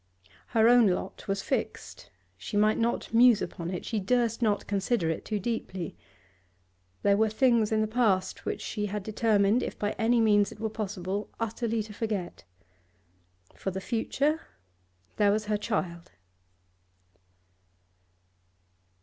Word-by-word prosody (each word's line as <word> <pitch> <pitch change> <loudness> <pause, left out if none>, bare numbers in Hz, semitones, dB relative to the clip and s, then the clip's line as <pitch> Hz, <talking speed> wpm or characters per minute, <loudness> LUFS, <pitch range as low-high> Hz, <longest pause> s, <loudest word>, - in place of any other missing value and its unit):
Her 225 -1 +3
own 240 -2 +6
lot 185 0 -3
was 195 0 -1
fixed; - - -4 0.3
she 205 - -5
might 215 +1 +3
not 230 0 -1
muse 235 -1 +6
upon 170 -2 -5
it, 180 -2 -5
she 220 - -1
durst 230 +3 0
not 210 -3 +1
consider 195 -3 0
it 160 - -4
too 210 -1 -2
deeply. 190 -5 -4 1.1
There 200 0 +4
were 220 +1 +3
things 230 -1 +2
in 215 0 +2
the 215 - +1
past 215 -5 +1
which - - -3
she 210 -1 -3
had 205 0 -4
determined, 215 +1 +2
if - - -4
by 205 0 -1
any 230 +1 +3
means 205 -2 +4
it - - -12
were 220 -1 -2
possible, 200 -2 -4
utterly 230 0 -1
to 210 0 -10
forget. 210 -5 -4 1.1
For - - -4
the 190 0 -4
future, 275 +9 0 0.8
there 205 -1 +4
was 215 +1 0
her 210 0 0
child. 185 -6 -3
215 Hz, 140 wpm, -28 LUFS, 200-230 Hz, 1.1 s, own